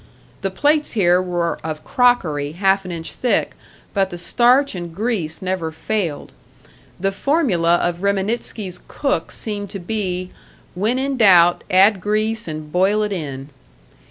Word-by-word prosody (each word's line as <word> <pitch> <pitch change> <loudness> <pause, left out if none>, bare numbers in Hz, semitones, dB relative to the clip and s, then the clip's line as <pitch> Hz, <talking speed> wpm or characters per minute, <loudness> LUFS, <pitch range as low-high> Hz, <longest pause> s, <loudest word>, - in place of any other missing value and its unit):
The 195 - -1
plates 295 +9 +1
here 180 -4 +3
were 175 -2 -2
of 155 -1 -5
crockery 160 - +1
half 195 +2 +1
an 180 - -5
inch 165 -1 -6
thick, 250 - 0 0.4
but 195 -2 +1
the 175 - -7
starch 245 +10 +3
and 175 -3 -7
grease 195 -7 -2
never 185 -3 -2
failed; 170 -2 -3 0.7
the 195 +2 0
formula 195 - +2
of 175 0 -1
Reminitsky's 200 -1 -1
cook 270 - -2
seemed 205 -2 -4
to 195 - -6
be, 185 -1 -3 0.4
When 215 +7 0
in 270 0 -1
doubt 175 -6 +5
add 190 +1 +5
grease, 215 +2 -1
and 155 -1 -6
boil 195 +5 +2
it 210 - -2
in. 140 -7 -5
190 Hz, 145 wpm, -20 LUFS, 175-215 Hz, 0.7 s, doubt